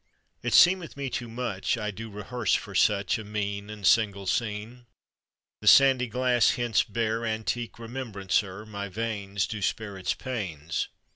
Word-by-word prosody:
It - - +1
seemeth 175 -4 +5
me 140 -2 -3
too 120 -1 -4
much 115 -4 -2
I 105 -2 -2
do 110 +3 -8
rehearse 105 +1 -1
for - - -4
such 100 0 +2
A - - -6
mean 100 -1 -4
And 105 -2 -7
single 100 -2 +3
scene. 110 +5 -3 0.7
The - - -7
sandy 135 -2 +7
glass 125 -1 +2
hence 120 -3 +2
bear 115 0 -1
Antique 110 +1 -2
remembrancer; 105 -5 -2
My 100 -2 -6
veins 100 -2 -2
Do 110 -2 -5
spare 100 0 -2
its 95 - -1
pains. 90 - -3
110 Hz, 150 wpm, -27 LUFS, 100-120 Hz, 0.7 s, sandy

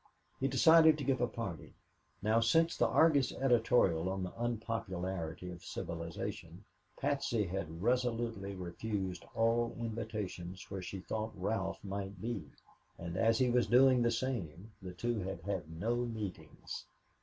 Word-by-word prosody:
He 135 - +1
decided 160 +1 +7
to 145 - -4
give 130 -1 +1
a 120 - +3
party. 95 -11 -6 0.5
Now, 110 +2 +4
since 165 +9 +3
the - - +3
Argus 150 -5 +4
editorial 115 -9 +3
on 95 0 -2
the 90 - -4
"Unpopularity 95 -7 -3
of 85 -1 -10
Civilization," 85 -1 -5 0.3
Patsy 120 -7 0
had 85 -2 -4
resolutely 115 -5 0
refused 95 +1 -4
all 115 +1 +2
invitations 105 -6 -5
where 95 -1 -3
she 90 +1 -6
thought 110 +3 -3
Ralph 95 0 -2
might 100 -1 -5
be, 110 -5 -3 0.5
and 85 0 -5
as 115 +3 +3
he 130 -2 +3
was 120 -1 +3
doing 125 +2 +6
the 120 - +3
same, 110 - -3
the 90 -1 -7
two 120 +4 -1
had 95 -3 -4
had 95 -4 -3
no 100 +9 -1
meetings. 105 -10 -5
110 Hz, 145 wpm, -34 LUFS, 90-120 Hz, 0.5 s, decided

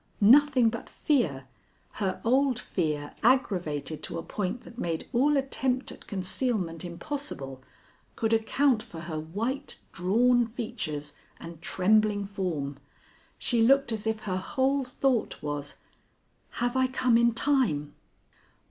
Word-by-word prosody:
Nothing 255 +1 +6
but 230 - -7
fear 165 - 0 0.5
her 190 -3 -2
old 260 +1 +3
fear 150 -10 -2
aggravated 180 - +1
to - - -5
a 165 - -4
point 205 +4 -3
that 235 - -12
made 165 -6 -2
all 285 +4 +4
attempt 265 -1 -1
at - - -13
concealment 190 -3 -1
impossible 170 - -5 0.5
could 225 0 0
account 225 +2 +2
for 165 -5 -9
her 160 -2 -4
white, 230 - -3 0.2
drawn 235 +6 +3
features 215 - -5 0.3
and 165 -1 -10
trembling 205 +3 +2
form. 170 -9 -3 0.6
She 235 -2 0
looked 275 +2 +4
as 220 -1 -3
if 220 -1 -1
her 185 -2 -2
whole 265 +8 0
thought 255 -1 0
was, 145 -1 -4 0.8
"Have 245 +1 -1
I 260 0 +3
come 255 -2 +2
in 235 0 +4
time?" 230 - +1
220 Hz, 130 wpm, -28 LUFS, 170-255 Hz, 0.8 s, Nothing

